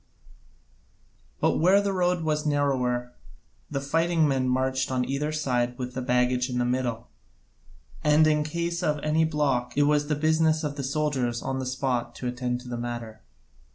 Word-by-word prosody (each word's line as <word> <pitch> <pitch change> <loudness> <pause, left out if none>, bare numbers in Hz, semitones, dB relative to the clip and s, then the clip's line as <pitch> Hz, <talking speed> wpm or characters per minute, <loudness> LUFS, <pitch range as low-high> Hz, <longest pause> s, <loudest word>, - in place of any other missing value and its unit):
But - - +2
where 185 +5 +5
the 200 -1 -1
road 180 -2 +1
was 155 -1 0
narrower 130 -5 0 0.6
the 140 - -2
fighting 165 +3 +1
men 130 -2 +1
marched 130 +1 0
on 125 -1 0
either 145 +3 -1
side 125 -5 -1
with 125 -1 -5
the 130 - -3
baggage 125 0 +1
in 125 - -2
the 125 - +1
middle, 120 -2 -2 0.9
and 150 +1 +5
in 150 -1 +3
case 170 +3 -2
of 150 -4 +1
any 155 +1 +2
block 135 -6 -1
it 145 - +5
was 145 0 +2
the 150 - +1
business 155 +1 +2
of 145 -1 -3
the 140 - -4
soldiers 135 -4 -1
on 135 0 -2
the 130 - -3
spot 125 -2 -2
to - - -7
attend 125 0 -2
to 125 - -12
the 120 -1 -4
matter. 120 -2 -6
135 Hz, 175 wpm, -26 LUFS, 125-155 Hz, 0.9 s, where